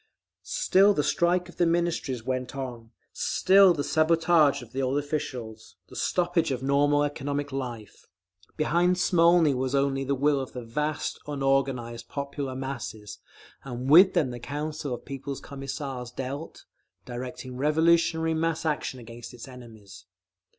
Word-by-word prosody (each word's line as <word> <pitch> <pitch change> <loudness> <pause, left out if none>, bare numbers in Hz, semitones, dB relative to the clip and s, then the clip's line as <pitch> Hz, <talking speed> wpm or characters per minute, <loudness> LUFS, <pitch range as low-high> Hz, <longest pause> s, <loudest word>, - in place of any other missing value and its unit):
Still 205 - +3
the 150 - +1
strike 175 +5 +1
of 175 - -15
the 175 - +3
Ministries 165 -8 -1
went 130 +1 -3
on, 120 -4 -6 0.2
still 195 0 +5
the 150 -4 -1
sabotage 155 -3 +3
of 115 - -15
the 135 - -1
old 130 +2 0
officials, 125 -7 -5
the - - -13
stoppage 175 -2 +1
of 130 -1 -3
normal 145 +1 +3
economic 145 0 -3
life. 120 -6 -6 0.5
Behind 175 +3 +2
Smolny 170 -4 +4
was 130 +1 -1
only 135 0 +1
the 140 +1 0
will 140 +1 +2
of 130 - -6
the 125 - -6
vast, 150 +6 -3
unorganised 135 -4 -1
popular 140 -1 -4
masses; 120 -6 -6 0.4
and 130 0 -4
with 185 +4 +8
them 150 -8 +2
the 120 - -7
Council 145 +1 -4
of - - -14
People's 140 0 -6
Commissars 135 -2 -6
dealt, 135 +5 -6 0.4
directing 125 +1 -7
revolutionary 160 +3 +2
mass 165 0 -1
action 150 -4 -2
against 120 +1 -10
its 120 - -10
enemies. 110 -7 -13
140 Hz, 145 wpm, -27 LUFS, 125-160 Hz, 0.5 s, with